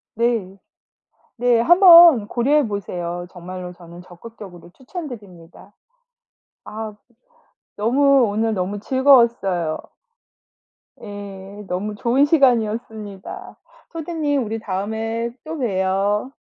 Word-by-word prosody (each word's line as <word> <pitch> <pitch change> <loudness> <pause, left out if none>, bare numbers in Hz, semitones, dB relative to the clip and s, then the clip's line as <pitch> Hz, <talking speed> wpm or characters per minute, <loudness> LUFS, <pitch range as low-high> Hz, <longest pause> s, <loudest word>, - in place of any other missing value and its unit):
네. 225 -5 -1 0.8
네. 240 -1 +2
한번 340 - +7
고려해 275 +5 +1
보세요. 175 -4 -5
정말로 180 0 -9
저는 175 0 -14
적극적으로 180 -1 -13
추천드립니다. 205 - -11 0.9
아 215 0 -7 0.8
너무 270 +5 +3
오늘 220 +2 -1
너무 195 +2 -3
즐거웠어요. 230 - +2 1.2
예. 200 -1 -10
너무 200 +4 -4
좋은 245 +6 +2
시간이었습니다. 220 - -1 0.4
소디님 310 -4 -2
우리 225 +1 -4
다음에 220 +4 -4
또 320 +1 -6
봬요. 200 0 -1
215 Hz, 220 characters per minute, -20 LUFS, 190-250 Hz, 1.2 s, 한번